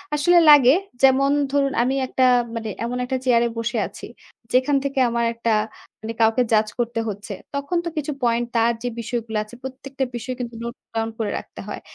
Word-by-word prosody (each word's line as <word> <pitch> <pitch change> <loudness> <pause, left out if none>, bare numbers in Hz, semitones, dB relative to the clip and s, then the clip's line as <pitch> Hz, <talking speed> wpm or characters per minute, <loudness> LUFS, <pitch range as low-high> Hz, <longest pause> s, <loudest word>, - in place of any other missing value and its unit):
আসলে 350 +4 +4
লাগে। 275 -3 +8 0.3
যেমন 270 +1 +5 0.2
ধরুন 275 -1 +1
আমি 260 +2 0
একটা 260 - 0 0.3
মানে 225 -1 -4
এমন 240 +2 -2
একটা 260 +1 -1
চেয়ারে 240 -2 +4
বসে 230 +1 -2
আছি। - - -10 0.5
যেখান 260 +3 +3
থেকে 275 -1 -2
আমার 235 0 0
একটা 230 0 -1 0.5
মানে 220 +1 -5
কাউকে 225 +3 +4
জাজ 215 0 +4
করতে 235 -1 -1
হচ্ছে। 205 +1 -6 0.2
তখন 280 +5 -2
তো - - -1
কিছু 300 0 -2
পয়েন্ট, 235 0 +2
তার 230 +1 +3
যে - - -1
বিষয়গুলো 230 -1 -3
আছে, 215 +3 -14
প্রত্যেকটা 265 +1 -5
বিষয় 245 +2 -4
কিন্তু 240 -1 -5
নোট 235 +1 -5 0.2
ডাউন 225 0 -1
করে 215 -2 -1
রাখতে - - -10
হয়। - - -6
240 Hz, 185 wpm, -22 LUFS, 230-270 Hz, 0.5 s, লাগে